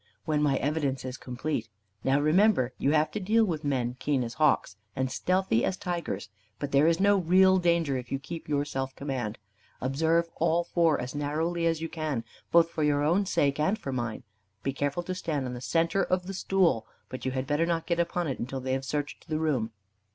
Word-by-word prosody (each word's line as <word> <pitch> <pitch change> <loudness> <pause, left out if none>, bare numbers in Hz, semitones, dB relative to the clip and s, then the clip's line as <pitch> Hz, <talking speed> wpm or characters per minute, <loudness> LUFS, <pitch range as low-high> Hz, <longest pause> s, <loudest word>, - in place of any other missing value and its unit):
"When 150 -2 +1
my 140 -2 +3
evidence 140 -3 -1
is 130 -1 -4
completed. 125 -2 -4 0.3
Now, 135 +1 +3
remember, 155 - +3
you - - +2
have 155 0 +3
to 215 - -3
deal 220 +4 +3
with 160 -6 -3
men 125 -3 -1
keen 140 -4 +1
as 115 -1 -5
hawks, 150 -9 +2 0.2
and 130 -1 -1
stealthy 185 -5 +1
as 190 - 0
tigers. 170 - -3 0.3
But 145 +4 -4
there 140 +3 +5
is 165 +1 +3
no 200 +1 +5
real 190 +1 +5
danger, 170 -6 +2
if 125 -1 -7
you 135 - +1
keep 160 +5 -8
your 145 -1 +1
self 135 -2 -4
command. 130 -6 -3 0.4
Observe 160 +6 +1
all 170 +2 +2
four 170 -3 +2
as 125 +1 -4
narrowly 160 +4 -1
as 165 -1 0
you 165 - -2
can, 155 -8 -3 0.3
both 170 0 +5
for 160 - -3
your 145 -1 +2
own 180 +6 +2
sake 140 -5 +1
and 190 +8 +2
for 135 - -5
mine. 120 -3 -3 0.4
Be 135 - -1
careful 145 +5 -1
to 185 - -3
stand 160 -7 -2
on 125 - -4
the 120 - -6
centre 165 +7 +1
of 180 0 0
the 195 - -5
stool. 185 - +1 0.2
But 130 - -7
you 130 - -1
had 130 0 -2
better 145 +4 +1
not 165 -1 0
get 170 -1 0
upon 170 0 0
it 135 - -3
until 130 +3 -3
they 130 0 -2
have 135 0 -1
searched 145 +3 -4
the 155 - 0
room. 145 -8 0
150 Hz, 215 wpm, -28 LUFS, 135-170 Hz, 0.4 s, there